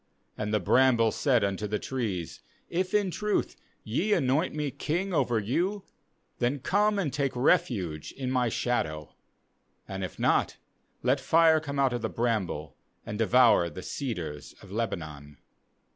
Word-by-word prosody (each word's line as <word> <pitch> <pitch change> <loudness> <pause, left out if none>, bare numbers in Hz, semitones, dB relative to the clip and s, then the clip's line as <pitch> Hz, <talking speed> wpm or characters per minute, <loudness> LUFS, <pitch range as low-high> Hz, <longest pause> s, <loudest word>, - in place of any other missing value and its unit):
IBAnd 105 -1 -3
the 105 - +2
bramble 115 +2 +4
said 130 -7 +2
unto 100 +1 -1
the 105 +1 -1
trees* 105 - -4 0.3
If 185 +3 -1
in 205 -3 +2
truth 210 +3 -1 0.3
ye 175 - 0
anoint 145 +2 +1
me 150 -2 -2
king 180 +8 -2
over 125 -6 +2
you, 175 - -1 0.6
then 125 +4 +1
come 205 +9 +1
and 170 -9 -1
take 140 -3 -1
refuge 100 - +1
in 130 -2 -4
my 125 -2 +2
shadow; 80 -12 -2 0.7
and 95 0 -5
if 90 - -6
not, - - +1 0.5
let 130 +3 +2
fire 160 +3 +4
come 140 -2 -5
out 135 -2 +2
of 120 - -2
the - - -2
bramble, 100 - -2 0.3
and 105 - -5
devour 115 -6 +5
the 85 +4 -9
ce 130 -5 -3
dars 75 -5 -7
of 95 - -14
Lebanon. 75 -10 -4
125 Hz, 155 wpm, -28 LUFS, 100-150 Hz, 0.7 s, devour